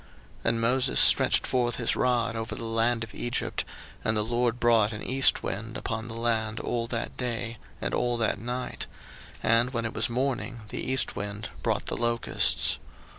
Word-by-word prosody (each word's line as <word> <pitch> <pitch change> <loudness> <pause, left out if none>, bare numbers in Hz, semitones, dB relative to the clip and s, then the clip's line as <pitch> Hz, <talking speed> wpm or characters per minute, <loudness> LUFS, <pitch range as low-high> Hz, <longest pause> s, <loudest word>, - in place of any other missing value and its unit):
02:010:013 - - -22
And 115 0 +1
Moses 125 +3 +2
stretched - - +6
forth 120 -2 +1
his 120 - +1
rod 120 -2 +1
over 110 0 -4
the - - -6
land 115 +1 +1
of 110 - -9
Egypt, 120 +1 -2 0.4
and 110 0 +1
the 105 - +3
LORD 120 +1 0
brought 115 -3 +3
an 105 - -6
east 135 +1 +4
wind 115 +5 -4
upon 115 -2 -4
the 115 - -7
land 115 -2 0
all 115 -1 -2
that 115 -1 -4
day, 115 -2 -3 0.2
and - - -3
all 120 -1 +1
that 115 -3 0
night; 125 +3 -4 0.6
and 115 +2 +3
when 115 -2 -1
it 115 - -3
was - - +1
morning, 125 -1 -2
the - - -4
east 130 0 +2
wind 100 +2 -5
brought - - -1
the - - -3
locusts. 120 0 +2
115 Hz, 180 wpm, -27 LUFS, 115-120 Hz, 0.6 s, stretched